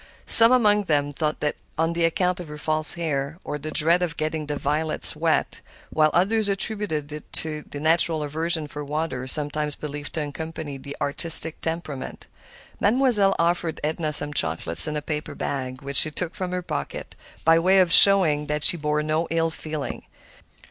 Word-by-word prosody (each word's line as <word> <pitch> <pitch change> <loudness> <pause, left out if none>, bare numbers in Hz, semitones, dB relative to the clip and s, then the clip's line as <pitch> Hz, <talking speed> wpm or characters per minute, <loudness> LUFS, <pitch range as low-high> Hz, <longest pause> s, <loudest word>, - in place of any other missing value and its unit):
Some 230 +1 +9
among 210 -5 +3
them 145 -3 0
thought 150 +1 -2
it 150 - -1 0.2
was 165 +1 +1
on 170 - -5
account 180 +2 0
of 175 - -8
her 150 0 -9
false 155 0 +1
hair, 150 -3 -3
or 150 - -5
the 155 +2 -7
dread 165 +3 +1
of 175 -4 -3
getting 155 -1 -3
the 145 -1 -3
violets 155 +2 0
wet, - - -1 0.3
while 155 -1 +3
others 205 +5 +1
attributed 195 -7 -1
it 150 0 -10
to 155 -1 0
the 145 - -7
natural 160 0 +1
aversion 160 +1 -2
for 150 0 -7
water 145 -3 -4
sometimes 150 +1 -2
believed 145 -1 -8
to 155 -2 -3
accompany 155 -1 -7
the 140 +1 -10
artistic 160 +2 0
temperament. 160 -5 -6 0.5
Mademoiselle 215 -4 +3
offered 170 -1 -1
Edna 155 0 -2
some 145 0 +1
chocolates 80 - +2
in 150 0 -3
a 150 - -5
paper 150 0 -5
bag, 130 -1 -5
which 140 -1 0
she 155 - +5
took 170 +3 -3
from 185 -1 -4
her 180 0 -4
pocket, - - -6 0.3
by 165 +1 +5
way 185 +3 +3
of 180 -3 +3
showing 165 -7 +6
that 150 0 -2
she 175 - +7
bore 150 0 -1
no 155 +2 -1
ill 165 0 0
feeling. 155 -2 -6
155 Hz, 180 wpm, -23 LUFS, 150-170 Hz, 0.5 s, Some